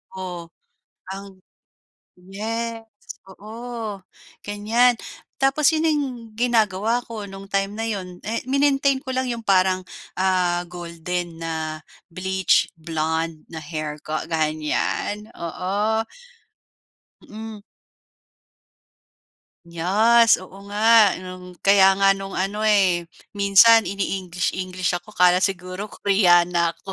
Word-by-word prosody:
Oh. 180 Hz, -3 st, -6 dB, 0.6 s
Ang 195 Hz, 0 st, -9 dB, 0.8 s
yes 225 Hz, +5 st, -4 dB, 0.4 s
oo 220 Hz, +1 st, -7 dB, 0.4 s
ganyan. 225 Hz, +4 st, +2 dB, 0.4 s
Tapos 270 Hz, +2 st, +3 dB
yun 320 Hz, -1 st, 0 dB
ning 300 Hz, -2 st, +2 dB, 0.3 s
ginagawa 225 Hz, -1 st, +1 dB
ko 225 Hz, -2 st, -6 dB
nung 195 Hz, 0 st, -10 dB
time 195 Hz, 0 st, -1 dB
na 225 Hz, -, -2 dB
'yon, 185 Hz, -4 st, -5 dB
eh, 225 Hz, +3 st, -1 dB
minintain 275 Hz, 0 st, +2 dB
ko 260 Hz, -, -5 dB
lang 260 Hz, 0 st, 0 dB
yung 230 Hz, -1 st, -5 dB
parang 185 Hz, -1 st, +3 dB, 0.3 s
ah 180 Hz, -2 st, +1 dB
golden 175 Hz, 0 st, -5 dB
na 160 Hz, -1 st, -4 dB, 0.3 s
bleach 190 Hz, +1 st, +1 dB
blonde 160 Hz, 0 st, -3 dB
na 160 Hz, -, -6 dB
hair 155 Hz, 0 st, -5 dB
ko 155 Hz, -, -5 dB, 0.2 s
ganyan 155 Hz, +6 st, -1 dB
oo. 205 Hz, +6 st, -1 dB, 1.1 s
Mhm. 220 Hz, -1 st, -9 dB, 2.2 s
Yes 225 Hz, +6 st, +4 dB
oo 185 Hz, +1 st, -13 dB
nga 205 Hz, +2 st, -3 dB, 0.4 s
no'ng 185 Hz, 0 st, -9 dB, 0.2 s
kaya 195 Hz, -1 st, +6 dB
nga 195 Hz, 0 st, +4 dB
no'ng 195 Hz, 0 st, -7 dB
ano, 205 Hz, +2 st, -4 dB
eh, 185 Hz, -5 st, +3 dB, 0.3 s
minsan 200 Hz, +2 st, +6 dB
ini-English 185 Hz, -2 st, -2 dB
English 185 Hz, -1 st, -2 dB
ako. 210 Hz, +5 st, -17 dB
Akala 180 Hz, 0 st, +5 dB
siguro 185 Hz, +1 st, -2 dB
Koreana 175 Hz, -4 st, +3 dB
ako. 195 Hz, -, -9 dB
195 Hz, 105 wpm, -22 LUFS, 175-220 Hz, 2.2 s, kaya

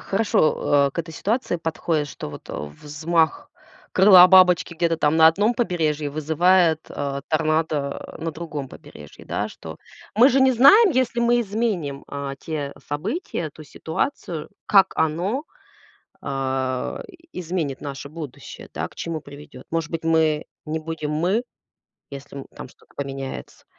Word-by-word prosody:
хорошо, 155 Hz, -8 st, +2 dB
э, -, -, -9 dB
к -, -, -8 dB
этой 165 Hz, -1 st, -4 dB
ситуации 220 Hz, -, -1 dB
подходит, 160 Hz, -2 st, -2 dB
что -, -, -7 dB
вот, -, -, -11 dB
а, -, -, -5 dB
взмах 150 Hz, -, -1 dB, 0.4 s
крыла 185 Hz, -1 st, +8 dB
бабочки 180 Hz, -2 st, +5 dB
где-то 165 Hz, 0 st, +1 dB
там 150 Hz, 0 st, +2 dB
на 160 Hz, 0 st, +7 dB
одном 205 Hz, +8 st, +3 dB
побережье 155 Hz, -, -1 dB
вызывает, 160 Hz, +2 st, +3 dB
а, 140 Hz, -1 st, -4 dB
торнадо, 155 Hz, -2 st, -1 dB
э, -, -, -10 dB
на 165 Hz, -, -2 dB
другом 150 Hz, -4 st, -6 dB
побережье, -, -, -13 dB
да, -, -, -2 dB
что. -, -, -10 dB, 0.4 s
Мы 240 Hz, +5 st, +7 dB
же 270 Hz, 0 st, +2 dB
не 265 Hz, 0 st, +5 dB
знаем, 285 Hz, -, +7 dB
если 255 Hz, -4 st, 0 dB
мы 240 Hz, 0 st, +3 dB
изменим, 200 Hz, -10 st, -2 dB
а, 140 Hz, -1 st, -5 dB
те 145 Hz, -1 st, -5 dB
события, 170 Hz, -, -3 dB
ту 155 Hz, -, -13 dB
ситуацию, 160 Hz, -, -4 dB, 0.2 s
как 195 Hz, -2 st, +5 dB
оно, 180 Hz, -, 0 dB, 0.8 s
а, 130 Hz, -1 st, -2 dB, 0.3 s
изменит 165 Hz, -6 st, -3 dB
наше 140 Hz, -1 st, -7 dB
будущее, 155 Hz, -3 st, -9 dB
да, -, -, -3 dB
к -, -, -22 dB
чему 165 Hz, -2 st, -4 dB
приведет. 145 Hz, -2 st, -12 dB
Может 165 Hz, 0 st, -2 dB
быть, 165 Hz, -1 st, -4 dB
мы 160 Hz, -2 st, +2 dB, 0.2 s
не 155 Hz, +1 st, -3 dB
будем 155 Hz, -1 st, -5 dB
мы, 175 Hz, +9 st, +1 dB, 0.7 s
если, 140 Hz, 0 st, -9 dB
м, 135 Hz, -, -8 dB
там -, -, -9 dB
что-то -, -, -24 dB
поменяется. 135 Hz, -1 st, -6 dB
160 Hz, 150 wpm, -23 LUFS, 145-185 Hz, 0.8 s, крыла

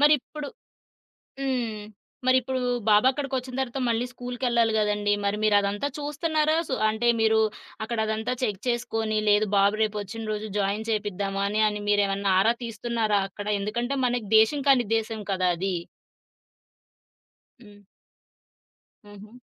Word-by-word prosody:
మరిప్పుడు 295 Hz, 0 st, +2 dB, 0.9 s
హ్మ్. 245 Hz, -6 st, -2 dB, 0.4 s
మరిప్పుడు 260 Hz, 0 st, +2 dB, 0.3 s
బాబక్కడికొచ్చిన 260 Hz, +3 st, +2 dB
తర్వాత 265 Hz, 0 st, -2 dB
మళ్ళీ 235 Hz, +1 st, +1 dB
స్కూల్కెళ్ళాలి 245 Hz, -2 st, 0 dB
గదండీ. 210 Hz, -1 st, +1 dB
మరి 200 Hz, +1 st, 0 dB
మీరదంతా 205 Hz, +4 st, +2 dB
చూస్తున్నారా 305 Hz, +1 st, 0 dB
సు 260 Hz, -, 0 dB
అంటే 220 Hz, +2 st, -1 dB
మీరు 220 Hz, 0 st, +4 dB, 0.4 s
అక్కడ 235 Hz, +1 st, -3 dB
అదంతా 220 Hz, +3 st, -2 dB
చెక్ 210 Hz, -4 st, -2 dB
చేసుకొని, 225 Hz, -3 st, -1 dB
లేదు 210 Hz, +1 st, +4 dB
బాబు 200 Hz, +2 st, +3 dB
రేపొచ్చిన 215 Hz, +1 st, -4 dB
రోజు 215 Hz, +1 st, -3 dB
జాయిన్ 205 Hz, +3 st, -1 dB
చేపిద్దామా! 200 Hz, -2 st, -2 dB
అని 215 Hz, +1 st, 0 dB
అని 210 Hz, 0 st, -5 dB
మీరేమన్నా 200 Hz, -1 st, +2 dB
ఆరా 225 Hz, +4 st, +4 dB
తీస్తున్నారా 230 Hz, -2 st, -1 dB
అక్కడ? 205 Hz, +1 st, -8 dB
ఎందుకంటే 240 Hz, +7 st, -2 dB
మనకి 240 Hz, -3 st, -1 dB
దేశం 250 Hz, +7 st, +4 dB
కానీ 260 Hz, -3 st, +5 dB
ఉద్దేశం 225 Hz, 0 st, -1 dB
కదా! 185 Hz, -1 st, +1 dB
అది. 190 Hz, +1 st, -1 dB, 1.9 s
హ్మ్. 205 Hz, -1 st, -16 dB, 1.3 s
హుహు. 205 Hz, +3 st, -13 dB
220 Hz, 120 wpm, -26 LUFS, 205-250 Hz, 1.9 s, కానీ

